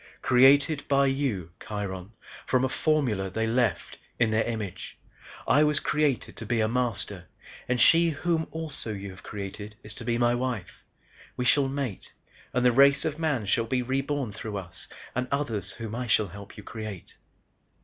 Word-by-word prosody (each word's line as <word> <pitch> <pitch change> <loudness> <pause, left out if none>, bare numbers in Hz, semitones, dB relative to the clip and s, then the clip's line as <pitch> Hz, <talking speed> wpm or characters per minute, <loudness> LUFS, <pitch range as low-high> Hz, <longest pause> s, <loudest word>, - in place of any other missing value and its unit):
"Created, 140 +4 +5
by 140 0 +4
you 135 - -1
Kiron 100 -1 -5 0.3
from 130 0 +3
a - - -1
formula 130 -12 +1
they 110 +4 -1
left, 115 -4 0 0.2
in 115 -2 +2
their 110 +1 +3
image. 110 -6 -5 0.5
I 150 - +5
was 150 -1 +2
created 150 -4 0
to - - -6
be 120 -1 +1
a 110 - +3
Master 105 -6 -2 0.4
and 125 0 0
she 165 +4 +6
whom 165 +2 0
you - - -6
also 150 -9 -5
have 95 -1 -8
created 105 +1 -7
is 105 - -6
to 115 - -8
be 115 0 0
my 120 0 +3
wife. 120 -6 -3 0.5
We 125 - -1
shall 135 +2 +4
mate 135 -7 -4 0.4
and 125 0 +1
the 125 - +6
race 140 +3 +5
of 155 0 -2
Man 145 -9 0
shall 115 +3 +1
be 125 +2 0
reborn 135 -1 -1
through 105 0 -5
us 90 -1 -8 0.3
and 125 0 -1
others 115 -9 -1
whom 110 -1 -6
I 125 +1 -3
shall 110 -3 +2
help 100 +3 -11
you 105 - -9
create." 110 -4 -8
120 Hz, 175 wpm, -27 LUFS, 105-140 Hz, 0.5 s, she